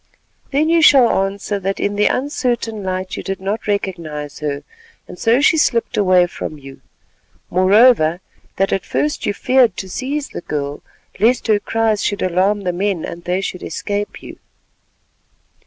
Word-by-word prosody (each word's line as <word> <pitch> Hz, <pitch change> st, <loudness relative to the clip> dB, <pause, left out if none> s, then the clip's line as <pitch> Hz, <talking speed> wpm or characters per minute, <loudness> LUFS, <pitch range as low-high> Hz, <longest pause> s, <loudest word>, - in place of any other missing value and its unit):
"Then 290 Hz, +3 st, +1 dB
you 335 Hz, 0 st, +3 dB
shall 270 Hz, -6 st, +6 dB, 0.2 s
answer 200 Hz, +1 st, -4 dB
that 195 Hz, +1 st, -3 dB
in 205 Hz, 0 st, -1 dB
the 210 Hz, 0 st, +3 dB
uncertain 245 Hz, -5 st, -1 dB
light 185 Hz, 0 st, -3 dB
you -, -, -5 dB
did 195 Hz, -1 st, -4 dB
not 200 Hz, +4 st, -3 dB
recognise 165 Hz, -8 st, -3 dB
her 145 Hz, -2 st, -3 dB, 0.4 s
and -, -, -11 dB
so 235 Hz, +4 st, +3 dB
she 320 Hz, +2 st, +4 dB
slipped 235 Hz, -6 st, +1 dB
away 185 Hz, -3 st, +4 dB
from 155 Hz, -3 st, -6 dB
you; 135 Hz, -1 st, -13 dB, 0.7 s
moreover, 185 Hz, -2 st, +4 dB, 0.4 s
that 195 Hz, +1 st, 0 dB
at 195 Hz, -, -1 dB
first 295 Hz, 0 st, -2 dB
you 205 Hz, -, +1 dB
feared 255 Hz, -1 st, +3 dB
to 190 Hz, -, -5 dB
seize 275 Hz, +8 st, -3 dB
the -, -, -7 dB
girl 145 Hz, -3 st, -4 dB, 0.4 s
lest 235 Hz, +5 st, +2 dB
her 215 Hz, -2 st, +3 dB
cries 220 Hz, -1 st, 0 dB
should 205 Hz, -, -1 dB
alarm 185 Hz, +3 st, +1 dB
the 180 Hz, -2 st, -2 dB
men 190 Hz, -2 st, -1 dB
and 170 Hz, 0 st, -8 dB
they 180 Hz, +2 st, 0 dB
should 180 Hz, -2 st, -5 dB
escape 205 Hz, 0 st, -4 dB
you." -, -, -11 dB
200 Hz, 165 wpm, -18 LUFS, 180-230 Hz, 0.7 s, shall